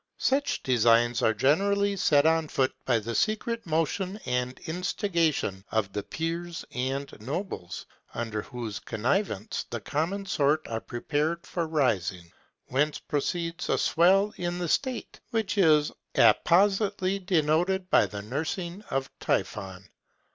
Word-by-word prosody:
Such 280 Hz, +2 st, 0 dB
designs 120 Hz, -1 st, +3 dB
are 110 Hz, -, +4 dB
generally 200 Hz, -, +2 dB
set 145 Hz, -6 st, +3 dB
on 160 Hz, 0 st, +3 dB
foot 130 Hz, -2 st, 0 dB
by 120 Hz, -3 st, +3 dB
the 115 Hz, +1 st, -4 dB
secret 220 Hz, -, -1 dB
motion 170 Hz, +5 st, -1 dB
and 125 Hz, 0 st, -1 dB
instigation 165 Hz, -, -1 dB
of 110 Hz, -3 st, 0 dB
the 105 Hz, -, -2 dB
peers 165 Hz, +5 st, -4 dB
and 135 Hz, +2 st, -3 dB
nobles, 135 Hz, -, -5 dB, 0.3 s
under 115 Hz, -2 st, -2 dB
whose 115 Hz, -3 st, -6 dB
connivance 115 Hz, -, -1 dB
the 115 Hz, -, -3 dB
common 165 Hz, -, -2 dB
sort 155 Hz, -4 st, +1 dB
are 115 Hz, -1 st, -3 dB
prepared 155 Hz, +7 st, -2 dB
for 170 Hz, -2 st, -2 dB
rising; 95 Hz, -, 0 dB, 0.4 s
whence 145 Hz, +3 st, +1 dB
proceeds 165 Hz, +3 st, -3 dB
a -, -, +3 dB
swell 195 Hz, +5 st, +3 dB
in 175 Hz, 0 st, -2 dB
the 175 Hz, -1 st, -2 dB
state, 260 Hz, -, -1 dB
which 225 Hz, -3 st, -1 dB
is 155 Hz, -5 st, +5 dB, 0.2 s
appositely 195 Hz, +1 st, +3 dB
denoted 180 Hz, +2 st, +1 dB
by -, -, +5 dB
the 100 Hz, -1 st, -7 dB
nursing 170 Hz, -, -4 dB
of 135 Hz, 0 st, -1 dB
Typhon. 95 Hz, 0 st, -2 dB
155 Hz, 130 wpm, -27 LUFS, 120-185 Hz, 0.4 s, is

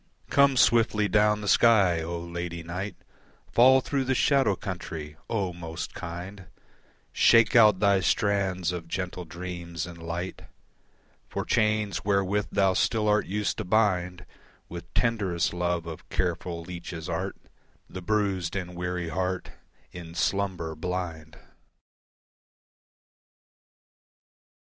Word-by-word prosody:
Come 140 Hz, -1 st, +4 dB
swiftly 115 Hz, -3 st, +4 dB
down 105 Hz, +1 st, +3 dB
the 105 Hz, -, -5 dB
sky, 100 Hz, -8 st, +4 dB
O 85 Hz, +1 st, -4 dB
Lady 85 Hz, 0 st, -5 dB
Night, 90 Hz, +5 st, -5 dB, 0.6 s
Fall 130 Hz, +2 st, +6 dB
through 135 Hz, 0 st, -1 dB
the 130 Hz, 0 st, +1 dB
shadow 135 Hz, -7 st, +3 dB
country, 80 Hz, -6 st, -6 dB
O 100 Hz, -6 st, -1 dB
most 85 Hz, -1 st, -6 dB
kind, 90 Hz, +2 st, -7 dB, 0.7 s
Shake 115 Hz, 0 st, +5 dB
out 105 Hz, -4 st, +7 dB
thy 100 Hz, -1 st, +4 dB
strands 95 Hz, -1 st, +1 dB
of 85 Hz, -2 st, -6 dB
gentle 90 Hz, 0 st, -4 dB
dreams 85 Hz, -1 st, -6 dB
and 85 Hz, -1 st, -10 dB
light 85 Hz, +3 st, -5 dB, 0.8 s
For -, -, -3 dB
chains, 105 Hz, -6 st, +1 dB
wherewith 100 Hz, 0 st, +1 dB
thou 95 Hz, -2 st, +3 dB
still 110 Hz, +3 st, +1 dB
art 105 Hz, 0 st, +2 dB
used 105 Hz, +2 st, -1 dB
to -, -, -1 dB
bind 90 Hz, -3 st, +1 dB, 0.4 s
With 85 Hz, 0 st, -9 dB
tenderest 100 Hz, -9 st, 0 dB
love 90 Hz, -1 st, -1 dB
of 80 Hz, -2 st, -9 dB
careful 85 Hz, -1 st, -2 dB
leeches' 85 Hz, -1 st, -7 dB
art 95 Hz, +3 st, -3 dB, 0.5 s
The 95 Hz, -, -8 dB
bruised 100 Hz, -3 st, -1 dB
and 90 Hz, -2 st, -4 dB
weary 90 Hz, -1 st, -3 dB
heart 90 Hz, +2 st, -2 dB, 0.4 s
In 85 Hz, -2 st, -9 dB
slumber 95 Hz, -4 st, -1 dB
blind. 80 Hz, -2 st, -5 dB
90 Hz, 120 wpm, -27 LUFS, 85-105 Hz, 0.8 s, out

